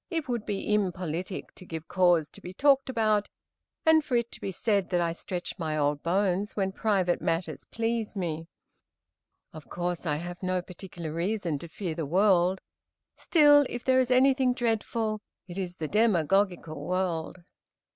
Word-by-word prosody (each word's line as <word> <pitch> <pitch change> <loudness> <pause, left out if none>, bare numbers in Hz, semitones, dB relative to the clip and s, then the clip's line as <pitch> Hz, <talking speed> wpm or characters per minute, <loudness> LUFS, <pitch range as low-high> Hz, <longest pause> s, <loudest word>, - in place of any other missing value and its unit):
It 325 -5 -2
would 240 -4 -3
be 205 +1 -1
impolitic 185 -2 -2
to - - -12
give 165 -2 -7
cause 175 -4 +3
to - - -14
be 180 - -8
talked 275 +4 +3
about, 215 -4 +1 0.6
and 320 -1 +6
for 260 - -2
it 235 -1 0
to - - -9
be 195 - -3
said 200 -1 0
that 180 - +1
I 170 -1 0
stretch 180 +2 -6
my 155 -2 -2
old 145 0 +1
bones 190 +3 0
when 195 -2 0
private 190 -4 +1
matters 165 +2 -2
please 225 -1 -2
me. 165 -4 -3 1.1
Of 155 -2 -11
course, 175 -1 -3
I 150 - +1
have 175 +3 -6
no 185 -1 0
particular 175 -3 -8
reason 175 -3 -1
to 170 - -8
fear 170 0 -4
the 160 -2 -4
world; 185 +1 +3 0.5
still, 290 -3 +5
if 245 - -5
there 260 0 +4
is 255 -1 +1
anything 255 0 +4
dreadful, 225 -2 -1 0.3
it 180 +1 -6
is 180 -2 -4
the 160 -3 -4
demagogical 180 -5 +1
world. 180 0 -2
185 Hz, 165 wpm, -28 LUFS, 170-220 Hz, 1.1 s, and